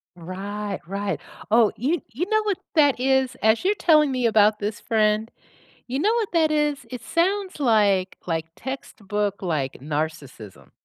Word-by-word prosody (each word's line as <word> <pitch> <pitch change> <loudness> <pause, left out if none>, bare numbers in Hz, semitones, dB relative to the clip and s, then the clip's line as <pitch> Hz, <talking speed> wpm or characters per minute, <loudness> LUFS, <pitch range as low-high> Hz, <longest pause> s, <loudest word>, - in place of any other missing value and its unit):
Right, 195 +3 -5
right. 200 -2 -3 0.3
Oh, 225 0 +5
y 300 +9 0
you 295 +10 -2
know 435 0 +2
what 410 -3 -1 0.2
that 290 -5 +4
is, 265 0 +2
as 220 +9 +3
you're 405 - +4
telling 305 -5 +4
me 250 -2 +1
about 215 -1 +4
this 210 +1 -3
friend, 215 -1 +1 0.6
you 260 +3 -2
know 415 +8 +2
what 445 -5 -1
that 320 -2 +3
is? 295 -2 0
It 250 - -6
sounds 375 0 -1
like 205 -6 +2
like 165 -1 -1
textbook, 210 -4 -4
like, 155 -8 -1
narcissism, 145 - -5
220 Hz, 155 wpm, -24 LUFS, 195-295 Hz, 0.6 s, Oh